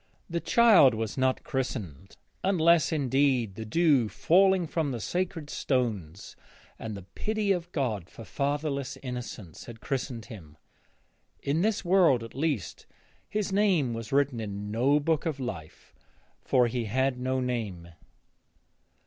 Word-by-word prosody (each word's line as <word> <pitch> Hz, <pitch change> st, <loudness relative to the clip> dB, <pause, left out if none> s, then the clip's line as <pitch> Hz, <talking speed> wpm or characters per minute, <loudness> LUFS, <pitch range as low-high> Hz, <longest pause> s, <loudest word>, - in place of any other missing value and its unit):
The 170 Hz, 0 st, -2 dB
child 200 Hz, -, +6 dB
was 110 Hz, -1 st, -3 dB
not 130 Hz, -1 st, 0 dB
christened, 100 Hz, -, -5 dB, 0.3 s
unless, 170 Hz, -4 st, +3 dB
indeed, 135 Hz, -6 st, +1 dB
the 110 Hz, +3 st, -7 dB
dew 140 Hz, -2 st, +3 dB
falling 190 Hz, -, +3 dB
from 160 Hz, -2 st, -1 dB
the 125 Hz, -3 st, -3 dB
sacred 170 Hz, 0 st, -3 dB
stones 105 Hz, -, -2 dB, 0.4 s
and 110 Hz, -2 st, -5 dB
the 100 Hz, -, -9 dB
pity 210 Hz, -, -2 dB
of 175 Hz, -2 st, -2 dB
God 110 Hz, -, -2 dB
for 115 Hz, -, -11 dB
fatherless 140 Hz, +4 st, -2 dB
innocents 125 Hz, -, -7 dB
had 115 Hz, -2 st, -10 dB
christened 125 Hz, -4 st, -4 dB
him. 80 Hz, -9 st, -12 dB, 0.9 s
In 145 Hz, +4 st, 0 dB
this 210 Hz, -1 st, 0 dB
world, 175 Hz, -10 st, +4 dB
at 115 Hz, -, -10 dB
least, 140 Hz, -, -3 dB, 0.4 s
his 210 Hz, -2 st, -2 dB
name 185 Hz, -, +2 dB
was 115 Hz, -1 st, -6 dB
written 140 Hz, -3 st, +1 dB
in 105 Hz, -1 st, -5 dB
no 130 Hz, +7 st, +3 dB
book 160 Hz, +2 st, 0 dB
of 150 Hz, -4 st, -3 dB
life, 95 Hz, -12 st, -7 dB, 0.5 s
for 125 Hz, -2 st, +3 dB
he 120 Hz, 0 st, -2 dB
had 130 Hz, +3 st, 0 dB
no 130 Hz, +1 st, -1 dB
name. 110 Hz, -9 st, -3 dB
130 Hz, 140 wpm, -28 LUFS, 110-160 Hz, 0.9 s, child